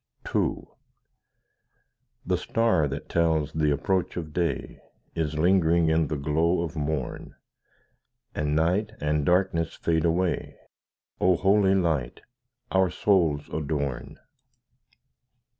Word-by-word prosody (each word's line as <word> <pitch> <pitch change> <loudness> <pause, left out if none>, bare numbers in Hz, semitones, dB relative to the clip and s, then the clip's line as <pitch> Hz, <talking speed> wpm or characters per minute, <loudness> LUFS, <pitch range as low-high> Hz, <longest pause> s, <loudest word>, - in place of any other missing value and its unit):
II - - 0 1.6
The - - +1
star 115 -10 +1
that 70 - -6
tells 80 -3 +1
the 75 -1 +1
approach 90 +7 -1
of 80 -3 -5
day 85 -3 -2 0.3
Is 80 -2 -2
lingering 85 -1 +3
in 80 -1 +2
the 75 - -3
glow 80 +5 +1
of 85 0 -6
morn, 75 -3 -4 1.0
And 75 0 -1
night 90 +7 +1
and 75 0 0
darkness 90 0 +1
fade 80 -1 0
away— 85 +2 -1 0.6
O 90 0 +4
Holy 95 +1 +3
Light, 80 -10 -1 0.5
our 95 -1 +3
souls 85 -9 +1
adorn! 70 -4 -3
80 Hz, 110 wpm, -26 LUFS, 75-90 Hz, 1.6 s, O